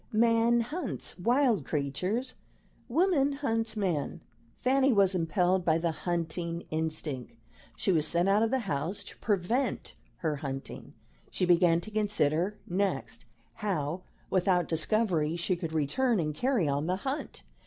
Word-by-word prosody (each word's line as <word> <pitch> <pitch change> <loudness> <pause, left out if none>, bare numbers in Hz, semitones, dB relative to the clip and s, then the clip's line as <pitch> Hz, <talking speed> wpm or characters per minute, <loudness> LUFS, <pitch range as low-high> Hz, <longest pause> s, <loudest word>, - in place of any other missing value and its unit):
Man 230 +1 +4
hunts 295 - -5
wild 240 - +3
creatures; 180 - -2 0.6
woman 290 -1 +3
hunts 225 -6 -1
man. 175 -8 -1 0.3
Fanny 270 +1 +3
was 200 -4 +4
impelled 180 +1 +1
by 160 -2 +3
the 165 0 0
hunting 170 0 -2
instinct. 155 - -3 0.4
She 195 - 0
was 160 -3 +2
sent 175 +3 +2
out 200 +2 +4
of 225 - +2
the 260 +1 +1
house 160 +4 -2
to - - -11
prevent 220 +6 -1 0.3
her 150 -2 +1
hunting; 135 -1 -6 0.3
she 180 - -1
began 175 -1 +4
to 215 - -9
consider 205 -3 +1
next, 175 -12 -2 0.3
how, 175 -4 -2 0.3
without 180 -2 +2
discovery, 165 -2 +1
she 175 +2 0
could 165 -2 -5
return 210 - +1
and 155 -2 -1
carry 235 - +1
on 145 +2 0
the 180 - +1
hunt. 275 +3 -4
180 Hz, 140 wpm, -29 LUFS, 160-225 Hz, 0.6 s, Man